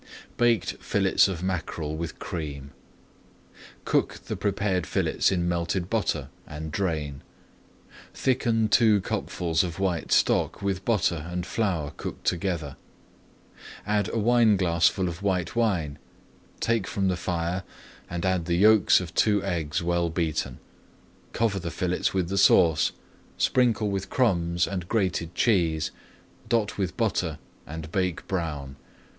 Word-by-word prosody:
BAKED 120 Hz, -2 st, +2 dB
FILLETS -, -, +3 dB
OF 90 Hz, -3 st, -4 dB
MACKEREL 85 Hz, -4 st, -3 dB
WITH 85 Hz, +1 st, -5 dB
CREAM 70 Hz, -4 st, -6 dB, 1.1 s
Cook -, -, +1 dB
the -, -, -3 dB
prepared 95 Hz, -4 st, -1 dB
fillets -, -, +1 dB
in 85 Hz, -2 st, 0 dB
melted 85 Hz, +1 st, -1 dB
butter 115 Hz, -2 st, 0 dB, 0.2 s
and 75 Hz, +1 st, -6 dB
drain. 75 Hz, -7 st, -2 dB, 0.9 s
Thicken 120 Hz, -4 st, +1 dB
two 110 Hz, -1 st, +5 dB
cupfuls 85 Hz, -1 st, -1 dB
of 85 Hz, -2 st, -4 dB
white 90 Hz, -5 st, -1 dB
stock -, -, +2 dB
with 95 Hz, -1 st, -2 dB
butter 85 Hz, -8 st, +1 dB
and 90 Hz, 0 st, -3 dB
flour 90 Hz, -11 st, -1 dB
cooked -, -, -7 dB
together, 85 Hz, -6 st, -1 dB, 1.1 s
add 105 Hz, -1 st, +1 dB
a -, -, -3 dB
wineglassful 100 Hz, -6 st, +3 dB
of 85 Hz, +1 st, -5 dB
white 95 Hz, -3 st, -1 dB
wine, 90 Hz, -12 st, 0 dB, 0.6 s
take 115 Hz, -5 st, 0 dB
from 95 Hz, -1 st, -1 dB
the 90 Hz, -, +1 dB
fire, 85 Hz, +1 st, -2 dB, 0.5 s
and 85 Hz, +1 st, -3 dB
add 95 Hz, -3 st, +1 dB
the 85 Hz, 0 st, 0 dB
yolks 105 Hz, -1 st, +6 dB
of 90 Hz, -1 st, -7 dB
two 105 Hz, -2 st, +3 dB
eggs 85 Hz, -4 st, -2 dB
well 85 Hz, 0 st, +1 dB
beaten. 80 Hz, -6 st, -2 dB, 0.7 s
Cover 110 Hz, -4 st, 0 dB
the 85 Hz, -2 st, -4 dB
fillets 90 Hz, +1 st, -1 dB
with 95 Hz, -3 st, 0 dB
the 100 Hz, +2 st, 0 dB
sauce, 85 Hz, -4 st, +5 dB
[Page -, -, -20 dB
222] -, -, -10 dB
sprinkle 115 Hz, -4 st, +2 dB
with 95 Hz, 0 st, -3 dB
crumbs 85 Hz, -8 st, +2 dB
and 90 Hz, -3 st, -4 dB
grated 90 Hz, -6 st, -1 dB
cheese, 85 Hz, -9 st, +2 dB, 0.6 s
dot 110 Hz, -3 st, 0 dB
with 90 Hz, -2 st, -2 dB
butter, 90 Hz, -9 st, 0 dB, 0.3 s
and 80 Hz, +1 st, -7 dB
bake 90 Hz, -2 st, -1 dB
brown. 75 Hz, -7 st, -3 dB
90 Hz, 135 wpm, -26 LUFS, 85-100 Hz, 1.1 s, yolks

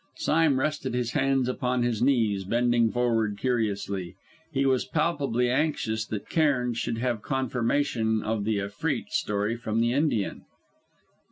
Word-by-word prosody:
Sime 155 Hz, -4 st, +2 dB
rested 135 Hz, -3 st, -1 dB
his 120 Hz, -2 st, -1 dB
hands 135 Hz, -2 st, +1 dB
upon 125 Hz, -1 st, 0 dB
his 120 Hz, -3 st, -1 dB
knees, 115 Hz, -7 st, +2 dB
bending 120 Hz, +2 st, +2 dB
forward 115 Hz, -4 st, 0 dB
curiously. 100 Hz, -7 st, -2 dB, 0.4 s
He 135 Hz, 0 st, +1 dB
was 130 Hz, -2 st, +2 dB
palpably 140 Hz, -7 st, 0 dB
anxious 120 Hz, -5 st, 0 dB
that 105 Hz, -2 st, -5 dB
Cairn 135 Hz, -7 st, +1 dB
should 115 Hz, 0 st, -2 dB
have 120 Hz, -2 st, -1 dB
confirmation 120 Hz, -3 st, 0 dB
of 110 Hz, -1 st, -1 dB
the 110 Hz, 0 st, 0 dB
Efreet 100 Hz, 0 st, -3 dB
story 105 Hz, +2 st, 0 dB
from 115 Hz, -1 st, -2 dB
the 120 Hz, +1 st, +2 dB
Indian. 140 Hz, -8 st, 0 dB
120 Hz, 140 wpm, -27 LUFS, 110-135 Hz, 0.4 s, Sime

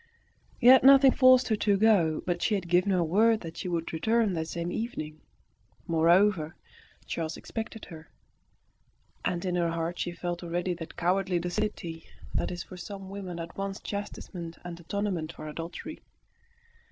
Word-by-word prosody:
Yet 255 Hz, +1 st, +8 dB
nothing 270 Hz, 0 st, +8 dB
forced 255 Hz, -1 st, +5 dB
her 220 Hz, -, +3 dB
to 205 Hz, -1 st, +2 dB
go; 190 Hz, -7 st, +3 dB
but 175 Hz, -1 st, -1 dB
she 215 Hz, -, +2 dB
had 185 Hz, -3 st, -3 dB
given 180 Hz, +3 st, +3 dB
her 180 Hz, -2 st, +2 dB
word 215 Hz, +7 st, +3 dB
that 165 Hz, -1 st, -8 dB
she -, -, -4 dB
would 170 Hz, -2 st, -2 dB
return 220 Hz, +4 st, +1 dB
that 160 Hz, -2 st, -2 dB
same 170 Hz, +1 st, -4 dB
evening. 155 Hz, -10 st, -5 dB, 0.6 s
Moreover, 170 Hz, 0 st, +3 dB, 0.5 s
Charles 160 Hz, -1 st, -4 dB
expected 225 Hz, -1 st, -6 dB
her, 160 Hz, -1 st, -11 dB, 1.2 s
and 175 Hz, 0 st, -1 dB
in 180 Hz, -, -1 dB
her 175 Hz, -1 st, +1 dB
heart 165 Hz, +1 st, -3 dB
she 175 Hz, -, -2 dB
felt 175 Hz, 0 st, -4 dB
already 175 Hz, +1 st, -2 dB
that 165 Hz, -2 st, -9 dB
cowardly 180 Hz, +1 st, +1 dB
docility 175 Hz, -2 st, -3 dB, 0.3 s
that -, -, 0 dB
is 175 Hz, -1 st, -5 dB
for 185 Hz, -, -11 dB
some 195 Hz, +1 st, -8 dB
women 185 Hz, -4 st, -6 dB
at 165 Hz, -, -7 dB
once 195 Hz, 0 st, -4 dB
the -, -, -31 dB
chastisement 180 Hz, -4 st, -6 dB
and 175 Hz, -1 st, -7 dB
atonement 170 Hz, -2 st, -3 dB
of 155 Hz, -, -8 dB
adultery. 165 Hz, -, -7 dB
175 Hz, 165 wpm, -28 LUFS, 170-205 Hz, 1.2 s, Yet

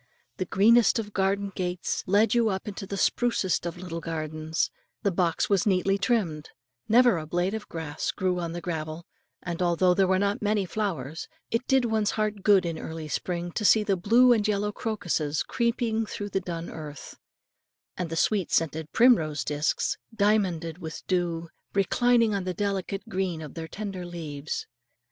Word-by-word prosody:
The 185 Hz, -, -1 dB
greenest 225 Hz, +7 st, +5 dB
of 210 Hz, -2 st, -4 dB
garden 195 Hz, +1 st, 0 dB
gates 180 Hz, -1 st, -2 dB
led 205 Hz, +3 st, +4 dB
you 235 Hz, -2 st, +3 dB
into 195 Hz, +1 st, -4 dB
the 200 Hz, -, -4 dB
sprucest 195 Hz, -5 st, +1 dB
of 170 Hz, -, -5 dB
little 175 Hz, -2 st, -5 dB
gardens; 160 Hz, -1 st, -2 dB, 0.3 s
the 200 Hz, -, +2 dB
box 170 Hz, -2 st, +1 dB
was 200 Hz, 0 st, +2 dB
neatly 195 Hz, 0 st, +2 dB
trimmed; 195 Hz, -8 st, 0 dB, 0.4 s
never 240 Hz, -4 st, +5 dB
a 155 Hz, -, -7 dB
blade 175 Hz, +4 st, 0 dB
of 220 Hz, -1 st, -5 dB
grass 160 Hz, -2 st, -4 dB
grew 185 Hz, -2 st, 0 dB
on 170 Hz, -1 st, -3 dB
the 175 Hz, -, -5 dB
gravel; 160 Hz, -1 st, -4 dB, 0.4 s
and 175 Hz, 0 st, -4 dB
although 180 Hz, +1 st, +3 dB
there 190 Hz, +1 st, +3 dB
were 190 Hz, 0 st, +3 dB
not 200 Hz, +4 st, 0 dB
many 210 Hz, -1 st, +1 dB
flowers, 170 Hz, -7 st, -3 dB, 0.2 s
it 230 Hz, +2 st, -1 dB
did 265 Hz, -2 st, +3 dB
one's 220 Hz, -2 st, +1 dB
heart 215 Hz, -1 st, -1 dB
good 195 Hz, -2 st, +5 dB
in 165 Hz, -1 st, -3 dB
early 160 Hz, -1 st, -6 dB
spring 175 Hz, +3 st, -3 dB
to 210 Hz, -, -3 dB
see 215 Hz, +1 st, +5 dB
the 200 Hz, -2 st, +1 dB
blue 235 Hz, +7 st, +5 dB
and 215 Hz, -2 st, +1 dB
yellow 210 Hz, 0 st, 0 dB
crocuses, 175 Hz, -9 st, -1 dB
peeping 235 Hz, -2 st, +1 dB
through 205 Hz, 0 st, -5 dB
the 195 Hz, -, -1 dB
dun 170 Hz, -2 st, -5 dB
earth, 150 Hz, -2 st, -9 dB, 0.8 s
and 180 Hz, -2 st, -3 dB
the 165 Hz, -, -3 dB
sweet 195 Hz, +1 st, +1 dB
scented 160 Hz, -1 st, 0 dB
primrose 160 Hz, -, +4 dB
discs, 150 Hz, +2 st, -1 dB, 0.2 s
diamonded 185 Hz, -6 st, +1 dB
with 160 Hz, -3 st, -7 dB
dew, 170 Hz, -2 st, -1 dB, 0.3 s
reclining 230 Hz, +3 st, +3 dB
on 200 Hz, -2 st, -1 dB
the 185 Hz, -1 st, -3 dB
delicate 200 Hz, 0 st, -2 dB
green 185 Hz, -3 st, -2 dB
of 155 Hz, -3 st, -8 dB
their 165 Hz, -1 st, -6 dB
tender 195 Hz, -1 st, -5 dB
leaves. 160 Hz, -4 st, -5 dB
185 Hz, 170 wpm, -27 LUFS, 165-210 Hz, 0.8 s, greenest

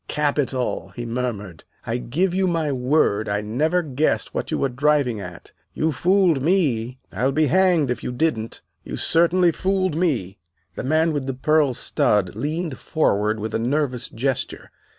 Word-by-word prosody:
"Capital!" 145 Hz, -4 st, -1 dB
he 120 Hz, -, -5 dB
murmured. 115 Hz, -8 st, -4 dB, 0.2 s
"I 115 Hz, +1 st, -1 dB
give 170 Hz, +10 st, 0 dB
you 190 Hz, 0 st, +1 dB
my 165 Hz, -4 st, 0 dB
word 125 Hz, -5 st, +1 dB
I 100 Hz, 0 st, 0 dB
never 155 Hz, +12 st, 0 dB
guessed 150 Hz, 0 st, 0 dB
what -, -, -3 dB
you -, -, -1 dB
were -, -, +1 dB
driving 140 Hz, -3 st, +1 dB
at. 90 Hz, -2 st, -10 dB, 0.2 s
You 160 Hz, +1 st, +1 dB
fooled 175 Hz, 0 st, +2 dB
me, 130 Hz, -8 st, +1 dB
I'll 130 Hz, +2 st, 0 dB
be 155 Hz, +3 st, +2 dB
hanged 175 Hz, -4 st, +3 dB
if 120 Hz, -, -4 dB
you -, -, -3 dB
didn't 125 Hz, -4 st, -2 dB, 0.2 s
you -, -, -6 dB
certainly 170 Hz, +1 st, +3 dB
fooled 185 Hz, -1 st, 0 dB
me." 125 Hz, -, -1 dB, 0.3 s
The -, -, -5 dB
man 155 Hz, +4 st, +2 dB
with 140 Hz, -3 st, -3 dB
the 135 Hz, -, -2 dB
pearl 150 Hz, -1 st, +2 dB
stud 100 Hz, -4 st, +1 dB
leaned 150 Hz, +4 st, -3 dB
forward 105 Hz, -8 st, 0 dB
with 110 Hz, +1 st, -4 dB
a -, -, 0 dB
nervous 130 Hz, 0 st, -1 dB
gesture. 130 Hz, +2 st, -3 dB
140 Hz, 165 wpm, -22 LUFS, 120-160 Hz, 0.3 s, hanged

